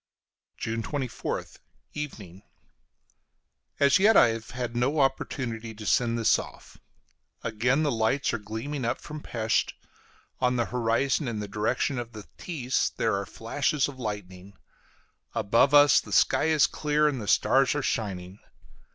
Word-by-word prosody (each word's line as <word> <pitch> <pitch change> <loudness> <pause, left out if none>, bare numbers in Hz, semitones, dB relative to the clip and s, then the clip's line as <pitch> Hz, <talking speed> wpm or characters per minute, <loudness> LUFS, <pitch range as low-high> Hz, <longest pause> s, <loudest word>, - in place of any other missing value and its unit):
JUNE 115 0 -3
24TH: 130 +1 -4 0.4
Evening. 105 - -7 1.4
As 140 +2 +5
yet 215 +3 +5
I 120 - +7
have 115 0 -5
had 120 -2 -5
no 135 +6 +1
opportunity 120 -4 -1
to 105 0 -9
send 115 +1 +2
this 115 - +3
off. - - -11 0.6
Again 120 +6 +1
the 145 - +1
lights 115 +4 0
are - - -1
gleaming 115 +7 -5
up 115 - -1
from 150 0 -8
Pesth; 110 -5 -1 0.7
on 125 0 +2
the 120 -1 +1
horizon, 125 +4 0
in 115 -2 -3
the 105 -1 -4
direction 105 +6 -1
of 120 -1 -7
the 105 -1 -8 0.2
Theiss, 135 -7 -1
there - - +1
are 100 0 -3
flashes 140 +5 -1
of 135 -2 -10
lightning; 100 -4 -6 0.8
above 115 +7 +3
us 145 0 +7
the - - -12
sky - - +3
is 155 -2 +4
clear 150 0 +1
and 135 -5 -1
the 105 - -7
stars 135 +7 +3
are 145 - -1
shining. 95 -5 -3
120 Hz, 150 wpm, -27 LUFS, 110-140 Hz, 1.4 s, I